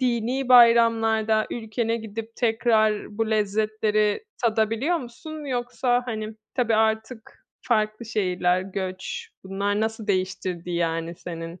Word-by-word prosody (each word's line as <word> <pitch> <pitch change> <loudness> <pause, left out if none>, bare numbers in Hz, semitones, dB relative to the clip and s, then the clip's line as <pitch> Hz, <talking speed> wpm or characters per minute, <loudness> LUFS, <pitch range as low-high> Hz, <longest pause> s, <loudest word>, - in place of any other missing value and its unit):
dinî 250 +1 0
bayramlarda 225 -2 +5
ülkene 230 0 -2
gidip 225 0 -7
tekrar 220 -3 +1
bu 225 -1 0
lezzetleri 215 - +1 0.2
tadabiliyor 225 +8 +1
musun, 300 +4 -8
yoksa, 245 -1 0
hani, 220 -1 -4 0.2
tabii 230 -3 +1
artık 220 +1 -1 0.2
farklı 215 -1 0
şehirler, 180 -4 +1
göç, 190 -1 -5 0.2
bunlar 200 +2 -1
nasıl 220 0 -2
değiştirdi, 185 -2 -2
yani, 165 -1 -1
senin 165 0 -8
220 Hz, 110 wpm, -24 LUFS, 205-235 Hz, 0.2 s, bayramlarda